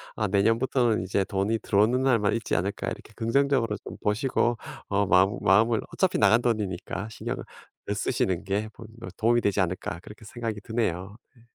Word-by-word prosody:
아 105 -2 0
내년부터는 115 +1 +2
이제 95 +1 0
돈이 100 +4 -1
들어오는 110 +5 +2
날만 115 -7 +2
있지 115 - -2
않을까 95 +5 -2
이렇게 - - -6
긍정적으로 115 -1 +1
좀 - - -8
보시고 120 +2 +1 0.3
어 100 0 +1
마음 95 +3 +4
마음을 110 +4 +4
어차피 190 -1 +1
나간 110 +3 +5
돈이니까 105 -2 -2
신경을 - - -5 0.4
덜 100 - -2
쓰시는 100 -5 -1
게 105 +2 -1
본인 110 0 -13
어 - - -5
도움이 120 +1 +3
되지 100 0 0
않을까 90 -2 -2
그렇게 105 +4 -13
생각이 115 -2 -5
드네요. 100 -3 -2 0.2
네. 115 0 -22
110 Hz, 400 characters per minute, -26 LUFS, 100-115 Hz, 0.4 s, 나간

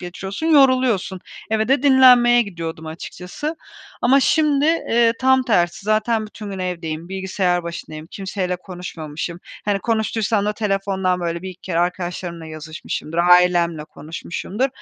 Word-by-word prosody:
geçiriyorsun, 190 - -5
yoruluyorsun. 255 - +3 0.3
Eve 220 +1 +1
de 270 0 +3
dinlenmeye 250 -3 +6
gidiyordum 165 -5 -6
açıkçası. 180 - -6 0.5
Ama 270 +3 +5
şimdi, 295 0 +2
eee, 235 -8 +3
tam 260 0 +4
tersi, 180 -6 +1
zaten 215 +1 +1
bütün 210 -1 -9
gün 195 - -6
evdeyim, 170 -2 -4
bilgisayar 190 -2 -1
başındayım, 160 -2 -7
kimseyle 190 -2 -3
konuşmamışım. 170 -2 -7 0.3
Hani, 205 -1 +1
konuştuysam 220 -1 0
da 210 - 0
telefondan, 195 -3 -1
böyle, 170 0 -3
1-2 185 -1 -8
kere 170 -3 -2
arkadaşlarımla 175 -1 -3
yazışmışımdır, 155 +1 -6
ailemle 175 -2 +4
konuşmuşumdur 170 - -4
190 Hz, 125 wpm, -21 LUFS, 175-230 Hz, 0.5 s, dinlenmeye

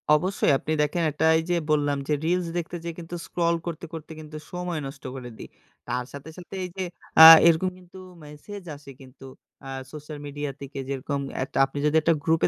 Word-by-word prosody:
অবশ্যই 185 +1 +1
আপনি 155 - -5
দেখেন 150 +3 0
একটা 150 +2 -1
এইযে 175 +2 -1 0.2
বললাম 145 -1 +2
যে 150 - +1
reels 175 +1 +1
দেখতে 175 0 -4
যেয়ে 170 -1 -5
কিন্তু 170 +1 -7
scroll 170 -1 0
করতে, 170 -1 -5
করতে 160 -1 -8
কিন্তু 155 0 -9
সময় 180 -2 -3
নষ্ট 135 0 -11
করে 125 -2 -7
দেই। - - -10 0.4
তার 125 +1 -2
সাথে, 140 +2 -9
সাথে 180 +1 -10
এইযে 185 +1 -5 0.4
আ - - +14 0.2
এরকম 170 +3 +3
কিন্তু 180 0 -16 0.3
মেসেজ 165 +7 -10
আসে 140 -1 -13
কিন্তু 135 0 -14 0.4
আ - - -7 0.2
social 150 0 -8
media 145 0 -4
থেকে 140 0 -7
যেরকম 140 +1 -3 0.2
একটা 135 - -6
আপনি 135 +1 -10
যদি 150 +1 +2
একটা 165 +2 +3
group 160 +1 +2
155 Hz, 190 wpm, -25 LUFS, 145-175 Hz, 0.4 s, আ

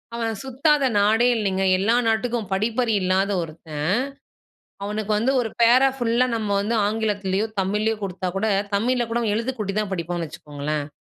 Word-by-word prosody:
அவன் 230 -1 -1
சுத்தாத 275 +2 +2
நாடே 220 +4 +4
இல்லைங்க, 195 -3 0
எல்லா 220 +5 +2
நாட்டுக்கும் 225 -1 0
படிப்பறிவில்லாத 205 -3 +1
ஒருத்தன், 155 -2 -6 1.0
அவனுக்கு 210 +1 -3
வந்து 245 +5 +1
ஒரு 225 -2 -3
பேரா 255 +4 +6
ஃபுல்லா 240 0 +2
நம்ம 215 -2 -3
வந்து 220 +3 -1
ஆங்கிலத்திலேயோ 205 -1 -1
தமிழ்யோ 210 +3 0
கொடுத்தா 185 -1 -3
கூட 205 +3 0 0.3
தமிழில 240 +3 +1
கூட 235 +1 0
எழுத்துகூட்டி 225 -4 -2
தான் 205 -2 -3
படிப்பானு 175 -1 -3
வச்சுகோங்களேன். 150 -1 -5
215 Hz, 135 wpm, -23 LUFS, 190-235 Hz, 1.0 s, பேரா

